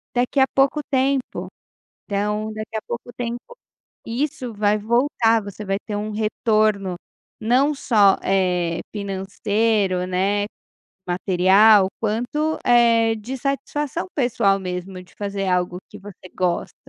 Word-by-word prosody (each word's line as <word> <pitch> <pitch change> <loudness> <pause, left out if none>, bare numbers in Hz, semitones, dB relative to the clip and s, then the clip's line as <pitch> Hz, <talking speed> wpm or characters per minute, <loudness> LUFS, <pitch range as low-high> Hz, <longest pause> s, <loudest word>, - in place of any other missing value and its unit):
daqui 250 +3 +1
a 265 - +6
pouco 275 +2 +3
tempo, 265 -1 0 0.6
então, 210 +2 -2
daqui 215 +1 -6
a 215 - -3
pouco 240 +1 -6
tempo 245 - -6 0.5
isso 255 0 -3
vai 210 0 +2
voltar 230 0 +2
você 200 +1 -8
vai 195 0 0
ter 210 - -5
um 210 +1 -3
retorno 215 -2 +1 0.5
não 260 +7 +3
só, 210 -8 +4
eh, 180 -3 +1 0.2
financeiro, 200 0 0
né, 195 +3 0 0.6
material, 190 +3 +5
quanto, 245 +9 -1
eh, 230 -2 +4
de 235 +5 -6
satisfação 280 +4 -3
pessoal 230 -7 +2
mesmo 180 0 -6
de 180 - -21
fazer 200 -1 -3
algo 180 -1 0
que 210 - -10
você 195 -2 -12
gosta. 180 -2 -1
215 Hz, 125 wpm, -22 LUFS, 195-245 Hz, 0.6 s, a